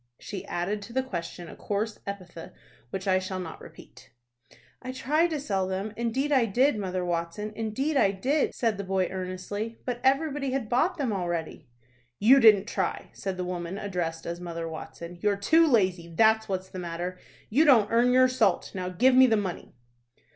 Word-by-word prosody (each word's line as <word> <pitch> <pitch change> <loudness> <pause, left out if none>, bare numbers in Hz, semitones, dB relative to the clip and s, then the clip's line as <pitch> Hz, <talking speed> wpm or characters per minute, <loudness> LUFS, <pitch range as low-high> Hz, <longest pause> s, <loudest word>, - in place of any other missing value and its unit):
She 195 - -7
added 185 +4 -2
to 230 +3 -10
the 260 +1 +1
question 175 -6 -6
a - - -10
coarse 210 +1 -3
epithet 185 -4 -8 0.3
which 190 +5 -5
I 185 -1 +4
shall 185 0 -4
not 165 -3 -7
repeat. - - -14 0.7
"I 255 - -5
tried 305 +6 +1
to 310 -2 -2
sell 195 -8 -1
them, 195 +3 -3
indeed 235 +6 -1
I 260 -5 +4
did, 255 +6 +3
Mother 185 -3 -3
Watson, 175 +5 -3
indeed 225 +8 -2
I 200 - +4
did," 260 +10 0
said 225 -4 0
the - - -2
boy, 190 -1 0
earnestly, 190 +4 -5
"but 245 -1 -3
everybody 275 0 +1
had 260 -5 -2
bought 335 +9 +1
them 265 -7 -1
already." 175 -7 -3 0.5
"You 255 +7 +6
didn't 210 -5 +6
try," 190 -5 -3
said 190 -2 -4
the 180 - -3
woman 180 +1 -4
addressed 175 -5 -3
as 170 0 -4
Mother 170 -1 -5
Watson. 170 +2 -8
"You're 205 -1 +1
too 320 +12 +4
lazy, 185 - +2
that's 220 +4 +3
what's 190 -1 -3
the 185 - -7
matter. 175 +1 -5 0.3
You 280 +8 +5
don't 240 -9 +5
earn 240 +2 +4
your 255 +1 +6
salt. 225 -8 +1
Now 180 -1 -3
give 250 +8 +3
me 260 0 +7
the 225 -2 +3
money." 190 -4 -5
205 Hz, 185 wpm, -27 LUFS, 185-250 Hz, 0.7 s, me